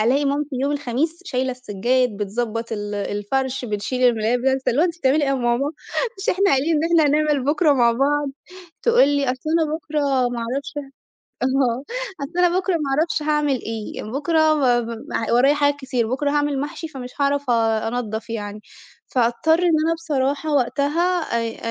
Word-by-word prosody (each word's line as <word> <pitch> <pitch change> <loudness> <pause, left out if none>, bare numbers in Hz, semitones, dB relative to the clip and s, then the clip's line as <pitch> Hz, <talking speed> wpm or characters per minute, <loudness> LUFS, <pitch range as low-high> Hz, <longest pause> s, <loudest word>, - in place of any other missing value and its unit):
ألاقي 260 +6 +2
مامتي 285 +1 0
يوم 285 +1 +1
الخميس 290 +5 -2
شايلة 260 -6 -1
السجاد، 250 0 0
بتضَبّط 225 +3 -3
ال 205 -1 -4
الفرش، 250 +6 -2
بتشيل 215 +4 -3
الملايات 230 +1 +1
بتاعة 265 +2 +2
السر 265 - -1
اللي 265 +6 +1
هو - - +5
أنتِ 340 -1 -2
بتعملي 285 +1 +2
إيه 275 - -1
يا 275 - +2
ماما؟ 255 +3 0 0.5
مش 390 - -5
إحنا 390 +2 +3
قايلين 290 +4 +2
إن 300 - +1
إحنا 330 -2 +4
هنعمل 300 -2 +1
بكرة 300 +2 +3
مع 240 -3 +4
بعض؟ 285 +3 +1 0.5
تقول 470 - +5
لي 285 -1 +1
أصل 260 +4 -2
أنا 320 -2 +1
بكرة 310 -2 -3 0.3
ما 245 0 -4
اعرفش 260 +5 -3
ه - - -1 0.6
آه 260 -1 +1 0.4
"أصل 330 +6 -4
أنا 355 +1 +2
بكرة 380 0 -1
ما 330 - 0 0.2
اعرفش 315 -1 0
هاعمل 295 -4 +1
إيه"، 220 -1 -5
"بكرة 285 +9 0 0.2
م 240 -5 0 0.3
ورايا 265 +4 +5
حاجات 285 -1 +2
كتير"، 255 -4 -1
"بكرة 285 +3 0
هاعمل 290 -2 0
محشي 295 +3 -5
فمش 265 -5 -8
هاعرف 285 -1 0
آآ 225 -2 +2
أنضف 225 -1 -4
يعني." 210 -2 -5 0.5
فأضطر 250 +7 +2
إن 360 - +1 0.2
أنا 330 - +2
بصراحة 290 -2 -1
وقتها 295 +7 +1
آآ 230 -5 -2
270 Hz, 175 wpm, -22 LUFS, 240-300 Hz, 0.6 s, هو